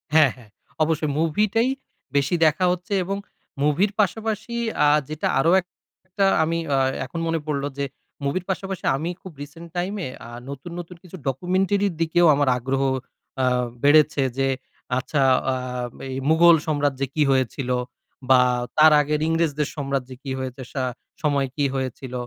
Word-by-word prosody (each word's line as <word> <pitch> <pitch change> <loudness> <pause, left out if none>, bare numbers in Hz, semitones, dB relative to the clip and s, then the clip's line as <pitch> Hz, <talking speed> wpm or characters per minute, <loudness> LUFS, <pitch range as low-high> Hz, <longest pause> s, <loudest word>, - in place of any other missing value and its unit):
হ্যাঁ, 150 -5 +6
হ্যাঁ। 120 -5 -17 0.3
অবশ্যই। 155 -1 0
মুভিটাই 210 +9 +2 0.5
বেশি 140 +4 +2
দেখা 160 +4 +3
হচ্ছে 180 +3 -3
এবং 195 +2 -3 0.5
মুভির 160 +8 +2
পাশাপাশি 220 +2 -2 0.3
আ - - +6 0.2
যেটা 155 0 -2
আরো 165 +5 +3 0.6
একটা, 195 +2 +1 0.2
আমি 165 +1 0 0.2
আ - - +2 0.3
এখন 165 - -6
মনে 165 0 0
পড়লো 145 -2 -1
যে, 140 - -1 0.4
মুভির 165 +6 -1
পাশাপাশি 190 0 -3
আমি 155 +5 -3
খুব 185 - -9
রিসেন্ট 165 +4 -9
টাইম 180 +3 -1
এ, - - -6 0.2
আ - - -10 0.2
নতুন, 140 +5 -7
নতুন 175 +1 -8
কিছু 185 +1 -10
ডকুমেন্টারি 190 - +1
দিকেও 165 +1 +3
আমার 145 -2 +2
আগ্রহ 135 +2 -1 0.6
আ - - +4 0.4
বেড়েছে 150 0 +5 0.2
যে, 135 - +2 0.5
আচ্ছা 140 +2 -1 0.3
আ - - -1 0.6
এই 130 - -4
মুঘল 170 +1 +7
সম্রাজ্যে 145 -3 0
কি 150 - +3
হয়েছিল? 130 0 0 0.6
বা 130 -1 +7 0.4
তার 155 0 +8
আগের 150 +1 -1
ইংরেজদের 160 -3 +1
সম্রাজ্যে 135 -3 -3
যে - - -40
কি 135 - -5
হয়েছে, 130 0 -5
সা 130 - -1 0.4
সময় 140 -3 +1
কি 145 - +1
হয়েছিল? 130 -1 -4
155 Hz, 155 wpm, -23 LUFS, 135-175 Hz, 0.6 s, তার